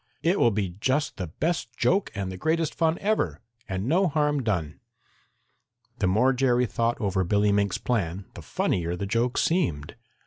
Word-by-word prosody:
"It 180 +4 +2
will 120 - +5
be 100 -3 -1
just 140 +5 0
the 90 - -4
best 130 - -3
joke 195 +2 +2
and 100 -2 -3
the - - -6
greatest 160 - 0
fun 165 0 +1
ever, 195 - 0 0.3
and 95 +1 -2
no 180 +8 +3
harm 150 -2 +1
done." 90 - -2 1.2
The - - +2
more 110 +8 +3
Jerry 125 -1 +2
thought 115 +1 -1
over 100 -4 0
Billy 105 +3 +2
Mink's 100 -2 +1
plan, 95 -5 -2
the - - -9
funnier 85 -1 -1
the 100 - -4
joke 115 +5 0
seemed. 130 - 0
115 Hz, 170 wpm, -26 LUFS, 95-150 Hz, 1.2 s, will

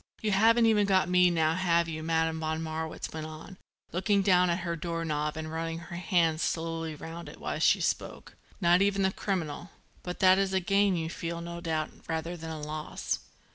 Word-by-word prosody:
"You 215 - +1
haven't 225 +4 +5
even 210 -2 +4
got 190 -2 +3
me 180 0 +5
now 160 -2 +2
have 170 -2 +2
you," 155 -1 -4
Madame 160 0 0
von 160 0 -2
Marwitz 160 0 -4
went 155 -1 -5
on, 160 +4 -10 0.3
looking 195 +2 +2
down 180 -2 +4
at 170 +2 0
her 170 -1 -2
door 165 0 -3
knob 150 0 -2
and 155 0 -5
running 165 0 -3
her 170 +1 -8
hand 170 -2 +1
slowly 165 -1 -2
round 165 +3 -8
it - - -12
while - - -3
she - - +4
spoke. - - -3 0.2
"Not 175 -1 +4
even 200 0 +2
the 190 - +3
criminal. 175 -4 -3 0.3
But 180 0 -5
that 185 0 +6
is 195 -1 0
a 190 - +3
gain, 195 +1 +2
you 165 -1 -2
feel, 170 0 -4
no 170 0 -6
doubt, 160 -2 -2 0.2
rather 165 +1 -3
than 165 -1 -7
a 160 -1 -5
loss." 155 +1 -3
170 Hz, 205 wpm, -29 LUFS, 160-185 Hz, 0.3 s, that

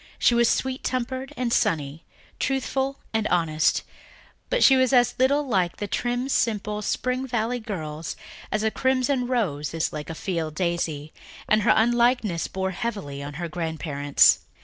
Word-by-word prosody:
She - - +4
was 235 -1 +4
sweet 260 0 -1
tempered 255 +1 -3
and 240 -1 -1
sunny, 150 0 0 0.3
truthful 270 +1 -1 0.2
and 220 -1 +1
modest, 160 -3 +2 0.7
but - - +2
she 270 - +7
was 260 0 +3
as 245 -1 +4
little 280 +3 +3
like 185 -7 0
the 205 - -3
trim, 245 +5 -1
simple 210 -5 0
Spring 255 +5 -1
Valley 240 0 -1
girls 160 -8 -5 0.4
as 215 0 0
a 220 - +1
crimson 260 0 +1
rose 165 - -1
is 165 - -1
like 150 -1 -6
a 160 - -5
field 160 -4 -3
daisy, 165 -4 -2 0.3
and 215 0 +3
her - - +4
unlikeness 235 -5 +2
bore 190 0 -2
heavily 185 -9 -4
on 145 0 -7
her 170 +2 -4
grandparents. 155 -4 +2
215 Hz, 155 wpm, -25 LUFS, 165-250 Hz, 0.7 s, she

